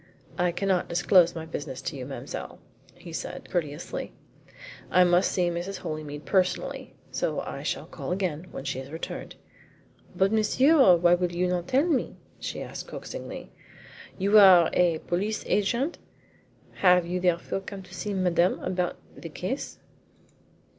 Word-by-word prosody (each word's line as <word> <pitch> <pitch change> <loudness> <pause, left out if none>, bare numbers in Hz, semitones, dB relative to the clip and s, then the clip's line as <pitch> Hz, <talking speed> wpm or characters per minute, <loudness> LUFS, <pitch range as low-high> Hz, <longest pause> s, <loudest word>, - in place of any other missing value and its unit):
"I 180 0 +1
cannot 185 0 0
disclose 175 0 +4
my 160 -1 -5
business 145 -4 -6
to - - -4
you, 130 -2 -6
mademoiselle," 135 - -7 0.4
he - - -11
said - - -6
courteously. 160 -3 -3 0.8
"I 180 - +5
must 175 +1 +3
see 180 -2 +1
Mrs. 175 +3 -4
Holymead 155 -3 -6
personally, 185 -2 0 0.2
so - - -1
I - - -6
shall - - -3
call - - -7
again 180 -3 -2
when - - -7
she 130 - -3
has 135 +1 -8
returned." 160 - -6 0.8
"But, 190 +1 +2
monsieur, 240 - +5
why 175 0 +4
will 175 0 +1
you 175 +1 0
not 180 -1 -1
tell 270 +4 +3
me?" 315 -7 0 0.2
she - - -4
asked - - -8
coaxingly. - - -8 0.7
"You 200 +3 +5
are 185 -4 +8
a 175 -2 +3
police 205 +5 -1
agent? 235 - 0 0.8
Have 180 -2 +5
you 180 +1 -2
therefore 180 +1 0
come 195 0 -8
to 185 0 -15
see 205 +2 -4
Madame 180 -1 +2
about 180 -1 -2 0.2
the - - -8
case?" - - -4
180 Hz, 150 wpm, -27 LUFS, 170-195 Hz, 0.8 s, are